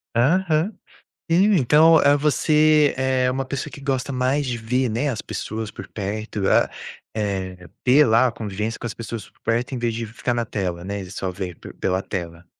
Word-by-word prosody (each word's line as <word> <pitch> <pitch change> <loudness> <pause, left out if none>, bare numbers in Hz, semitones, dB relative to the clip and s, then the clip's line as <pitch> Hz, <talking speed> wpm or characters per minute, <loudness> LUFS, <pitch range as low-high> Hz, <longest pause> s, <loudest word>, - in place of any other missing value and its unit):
Aham. 160 - +2 0.6
Hum, 195 +6 +4
então, 155 +4 +6
ah, 145 -1 +5
você 150 0 +3
é 130 -1 +1
uma 135 +1 -1
pessoa 140 +2 -4
que 140 - -10
gosta 135 -1 -1
mais 130 +3 +1
de 125 -2 -2
ver, 125 +3 0
né, 120 +7 0
as 115 -4 -3
pessoas 110 -1 -5
por - - -9
perto, 105 0 -3
ah - - +4 0.4
eh, 95 -4 -3 0.2
ter 140 +4 +6
lá 115 +3 +4
a 120 - -2
convivência 105 +1 -4
com 120 - -4
as - - -5
pessoas 115 -1 -7
por - - -34
perto, 120 +3 -1
em - - -2
vez 120 -1 -1
de 115 +1 -3
ficar 115 +2 -3
na 120 -1 -1
tela, 90 -6 -3
né, 100 +1 -4
e 95 -1 -9
só 95 -1 -3
ver 90 -2 -5
por - - -10
pela 95 0 -1
tela. 85 -3 -6
120 Hz, 200 wpm, -22 LUFS, 105-140 Hz, 0.6 s, então